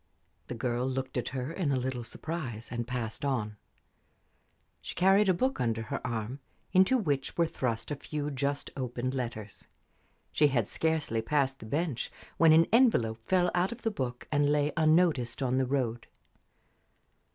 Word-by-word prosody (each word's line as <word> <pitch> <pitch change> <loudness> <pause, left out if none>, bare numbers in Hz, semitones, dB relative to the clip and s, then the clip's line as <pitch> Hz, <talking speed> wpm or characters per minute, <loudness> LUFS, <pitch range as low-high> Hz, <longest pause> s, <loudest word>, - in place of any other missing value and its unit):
The 125 - -5
girl 120 +1 -1
looked 130 0 -3
at 125 -2 -1
her 130 +2 -4
in 165 -5 0
a - - +2
little 125 -1 -2
surprise 125 -5 -5
and 120 -1 -3
passed 120 -2 -4
on. 110 -7 -1 1.2
She - - -7
carried 195 +3 +4
a - - +5
book 260 - 0
under 115 -2 0
her 110 - -4
arm, 115 +3 -3 0.3
into 190 +7 +5
which 145 - -1
were 170 - +4
thrust 125 -5 -3
a - - 0
few 150 +1 -4
just 140 +1 -2
opened 130 -1 -3
letters. 115 -5 -5 0.6
She 150 - +4
had 120 -7 +1
scarcely 160 -8 0
passed 135 +2 0
the 110 - -9
bench 145 -1 -2 0.3
when 165 -1 +6
an 160 +1 +7
envelope 120 - +4
fell 180 -1 +3
out 180 +2 +1
of 235 - -8
the 225 - +1
book 125 -9 -4
and 145 0 +3
lay 150 0 +2
unnoticed 155 -6 +2
on 130 0 +1
the 130 - +1
road. 120 -4 -1
135 Hz, 165 wpm, -30 LUFS, 120-160 Hz, 1.2 s, an